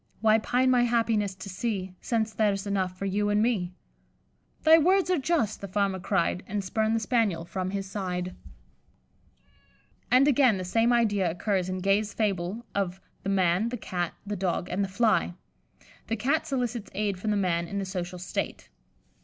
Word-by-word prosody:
Why 220 +1 +4
pine 255 +3 +2
my 250 -1 +4
happiness 225 -4 +1
to 190 +1 -9
see, 190 -1 -3
Since 225 -2 -1
there's 205 -2 +1
enough 190 -2 -1
for 195 - -4
you 205 +2 0
and 205 0 +2
me?' 210 -6 +1 0.9
'Thy 320 +1 +8
words 370 +3 +3
are 360 - +2
just,' 280 - 0
the 200 - -5
Farmer 195 0 0
cried, 180 -1 0
And 205 0 -2
spurned 220 +4 0
the - - +2
Spaniel 215 -8 0
from 185 +2 -3
his 195 0 -3
side." 185 -2 -3 1.8
And, 255 +3 +5
again, 260 -6 +4
the 185 - -4
same 225 +6 +2
idea 205 -6 +2
occurs 185 +2 -1
in 185 0 -3
Gay's 200 +2 +1
fable 200 +1 -1
of 190 -2 -2 0.2
the 195 - -3
"Man, 190 +2 +2
the 245 - -4
Cat, 175 -5 -3
the 205 0 -3
Dog, 180 -1 -2
and 195 +3 0
the - - -1
Fly." 195 -4 +1 0.7
The 225 - 0
Cat 280 +8 0
solicits 245 -6 -2
aid 200 -2 -1
from 215 - -2
the 210 - +2
Man 170 -3 0
in 200 - -5
the 195 - -1
social 180 -1 -4
state. 180 0 -4
200 Hz, 180 wpm, -27 LUFS, 185-230 Hz, 1.8 s, Thy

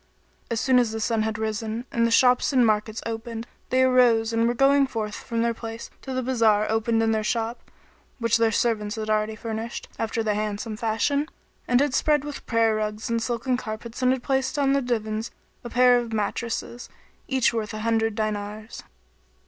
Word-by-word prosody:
[FN#27] - - -39
As 225 - 0
soon 260 0 +4
as 240 -3 +1
the 220 - -4
sun 225 0 0
had 220 0 -1
risen 220 +2 -3
and 230 0 +2
the - - 0
shops 250 +3 +4
and 255 -3 +4
markets 215 0 0
opened, 230 0 -5 0.2
they 260 0 +3
arose 240 -3 +4
and 230 +1 +1
going 275 +1 +4
forth 220 -4 -4
from 230 +1 -3
their 235 0 +1
place 225 0 -8
to 265 - -7
the 255 0 -1
bazar 225 -4 +3
opened 225 0 +1
their 220 -1 +1
shop, 230 +2 -2 0.5
which 230 -2 +2
their 230 -1 +2
servants 215 -1 0
had 215 -1 -3
already 215 0 0
furnished, 225 +1 -5
after 225 0 -1
the 215 -1 +1
handsomest 210 +1 -3
fashion, 235 +7 +1 0.4
and 245 +1 +4
had 285 -2 +1
spread 295 -1 +2
with 295 -1 -8
prayer 230 -1 +3
rugs 215 +1 -3
and 230 0 +1
silken 245 +2 -1
carpets 230 +1 -7
and 255 0 +4
had 260 -2 -1
placed 265 +2 0
on 275 -1 +3
the 275 - +2
divans 220 -2 -2 0.3
a 240 - -6
pair 250 0 +5
of 235 -1 -5
mattresses, 230 +2 -3 0.4
each 265 -3 +2
worth 215 -2 -2
an 215 - -5
hundred 225 -1 +1
dinars. 215 0 -4
230 Hz, 190 wpm, -25 LUFS, 220-245 Hz, 0.5 s, pair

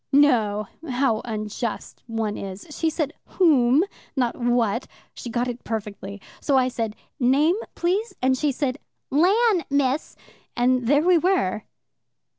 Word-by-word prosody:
No 230 -8 +3 0.2
how 250 -3 +1
unjust 215 0 -4
one 225 -2 -2
is. 195 0 -7
She 320 +2 0
said 310 -2 -2
'whom,' 285 -5 +4 0.3
not 245 -4 0
'what.' 240 -1 0 0.3
She 240 - -7
got 240 +2 -1
it 245 0 -5
perfectly. 205 -2 -5 0.2
So 280 -2 +2
I 255 -1 +3
said, 225 -3 -3 0.2
'Name, 280 +7 +3 0.2
please?' 385 +7 -1
and 260 +1 +2
she 290 +2 0
said, 275 0 -2 0.3
'Lan, 380 - +3
Miss,' 280 +1 0 0.4
and 250 0 +2
there 290 +3 +4
we 355 -1 +5
were. 310 - +1
255 Hz, 135 wpm, -24 LUFS, 225-295 Hz, 0.4 s, we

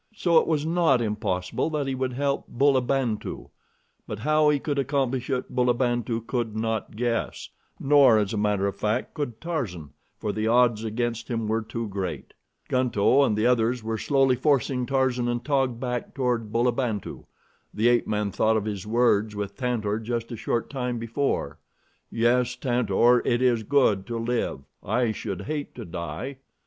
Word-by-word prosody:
So 170 -5 +4
it - - -2
was 155 -2 0
not 165 -5 +3
impossible 105 - -1
that 150 -3 -1
he 135 - -2
would 130 -1 -2
help 140 +2 -1
Bulabantu; 130 -3 0 0.6
but 105 - -4
how 155 +6 +3
he 150 - +3
could 140 0 -2
accomplish 135 -2 -1
it 130 -2 -2
Bulabantu 120 -2 +1
could 115 -4 -2
not 110 -1 -2
guess; 115 0 -2 0.3
nor 140 -5 +6
as 105 -1 0
a - - -1
matter 105 -1 +1
of 100 - -1
fact 105 +2 -1
could 125 -7 -4
Tarzan, 105 - -4 0.3
for 105 - -2
the 110 0 -1
odds 120 -2 +3
against 115 +1 -2
him 115 -3 -2
were 110 +1 0
too 115 +1 -5
great. 95 -3 -5 0.3
Gunto 125 0 +3
and 110 -6 +1
the 110 - +1
others 120 -1 +2
were 110 0 -3
slowly 135 -2 +3
forcing 130 -2 +1
Tarzan 130 -3 +1
and 120 0 -2
Taug 135 -5 +1
back 125 -1 -4
toward 120 -5 -1
Bulabantu. 120 -3 -1 0.5
The 115 +3 +2
ape 120 -1 +2
man 105 -1 -1
thought 110 +4 +2
of 105 - -2
his 105 -2 -4
words 110 -2 +2
with 100 -1 -4
Tantor 110 -4 -1
just 115 +1 -4
a - - -3
short 115 +1 -2
time 125 -3 -2
before: 115 - -2 0.5
"Yes, 120 +2 +2
Tantor, 125 -1 +3
it 120 - +1
is 125 -3 +2
good 110 -6 +2
to 120 -1 -3
live. 115 - -2 0.2
I 115 +2 +1
should 100 -3 -5
hate 145 +5 -4
to 115 - -7
die." 95 +10 -5
120 Hz, 170 wpm, -25 LUFS, 110-130 Hz, 0.6 s, nor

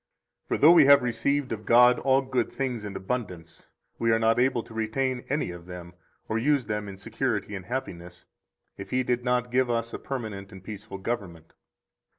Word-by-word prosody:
For - - 0
though 155 - +7
we 165 -4 +7
have 140 -2 +7
received 130 +4 -1
of 110 -1 -4
God 125 +2 +6
all 135 0 +2
good 130 -3 -1
things 125 -5 -3
in 100 -2 -6
abundance, 95 -6 -5 0.3
we 115 - +1
are 115 - +4
not 115 +1 +2
able 125 -2 +2
to - - -14
retain 125 +3 -1
any 140 -8 -1
of 85 0 -11
them 90 -1 -9 0.3
or 110 - -1
use 140 0 +2
them 105 0 -3
in 95 - -9
security 100 +1 -3
and 95 -2 -7
happiness, 90 -8 -6 0.5
if 95 0 -8
He 130 +3 +1
did 125 0 -1
not 125 -1 0
give 130 0 +2
us 115 -1 -1
a - - -5
permanent 110 -7 -6
and 95 -1 -12
peaceful 105 0 -8
government. 95 -6 -5
115 Hz, 190 wpm, -27 LUFS, 100-130 Hz, 0.5 s, though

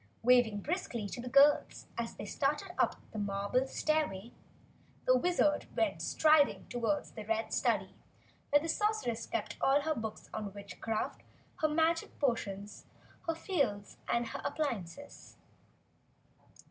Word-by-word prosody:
Waving 240 -4 +4
briskly 290 - -2
to 240 - -5
the 250 - -6
girls 280 +3 +4
as 235 0 -3
they - - -7
started 295 - -1
up - - +2 0.2
the 220 - -5
marble 200 +6 0
stairway, 265 -9 -1 0.7
the 255 - +5
Wizard 300 +1 +2
went - - +1
striding 310 -2 +4
toward 245 +5 0
the 215 - -6
red 225 +1 -1
study - - +1 0.6
where 290 - +6
the 320 - -4
Sorceress 415 - 0
kept - - -3
all 275 +2 +4
her 315 +2 0
books 220 -5 -6
on 205 -2 -5
witchcraft, 205 +2 -4 0.4
her 310 - +2
magic 325 +2 +1
potions, 210 -7 -2 0.4
her 330 - +1
phials 275 - -1
and 235 0 +1 0.2
appliances. 280 - -4
250 Hz, 130 wpm, -33 LUFS, 215-305 Hz, 0.7 s, where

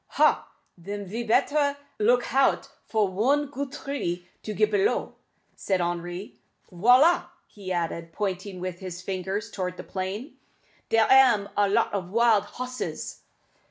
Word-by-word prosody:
"Ha! - - +3 0.3
den 200 +3 -5
ve 215 +6 -4
better 285 +5 +2 0.2
look 240 +3 +4
hout 270 +1 +2 0.2
for 215 -2 +2
one 255 +10 +1
goot 280 -1 -4
tree 225 -12 -4
to 215 - -5
get 425 - +1
b'low," 415 0 +1 0.4
suggested 190 -2 -1
Henri. 175 +2 -4 0.3
"Voilà!" 250 - +5 0.2
he 195 -3 -9
added, 170 -1 -2
pointing 190 0 -3
with 180 -1 -5
his 185 -1 -7
finger 190 +1 -2
towards 185 -4 -5
the - - -7
plain; 195 +9 -5 0.5
"dere 225 -1 +4
am 250 -7 +5
a 205 -1 +3
lot 200 - +2
of 185 -3 -3
wild 225 -1 +3
hosses." 255 0 -6
205 Hz, 140 wpm, -26 LUFS, 185-255 Hz, 0.5 s, Voilà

